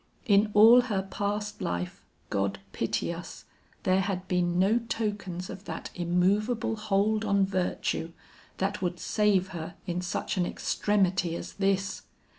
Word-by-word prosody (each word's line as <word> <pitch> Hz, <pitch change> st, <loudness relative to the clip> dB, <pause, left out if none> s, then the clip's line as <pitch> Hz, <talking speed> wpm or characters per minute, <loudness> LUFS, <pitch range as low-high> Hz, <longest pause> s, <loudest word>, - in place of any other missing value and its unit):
In 205 Hz, -1 st, +4 dB
all 225 Hz, +4 st, +9 dB
her 195 Hz, -3 st, 0 dB
past 205 Hz, +2 st, -3 dB
life, 90 Hz, 0 st, -3 dB, 0.3 s
God 100 Hz, 0 st, 0 dB, 0.2 s
pity 115 Hz, +8 st, -1 dB
us, 170 Hz, +1 st, -9 dB, 0.4 s
there 185 Hz, 0 st, +3 dB
had 185 Hz, -1 st, -3 dB
been 175 Hz, -1 st, +1 dB
no 200 Hz, +6 st, +4 dB
tokens 205 Hz, -6 st, -3 dB
of 195 Hz, -, -9 dB
that -, -, -6 dB
immovable 195 Hz, +7 st, +1 dB
hold 215 Hz, +1 st, +1 dB
on 200 Hz, -2 st, +3 dB
virtue, 185 Hz, -3 st, -1 dB, 0.5 s
that 195 Hz, +2 st, -1 dB
would 180 Hz, -1 st, -2 dB
save 200 Hz, -3 st, +2 dB
her 170 Hz, 0 st, -6 dB
in 175 Hz, 0 st, -2 dB
such 180 Hz, +2 st, -3 dB
an 180 Hz, -, +2 dB
extremity 190 Hz, -4 st, +1 dB
as -, -, -6 dB
this. 195 Hz, 0 st, 0 dB
195 Hz, 140 wpm, -28 LUFS, 180-210 Hz, 0.5 s, all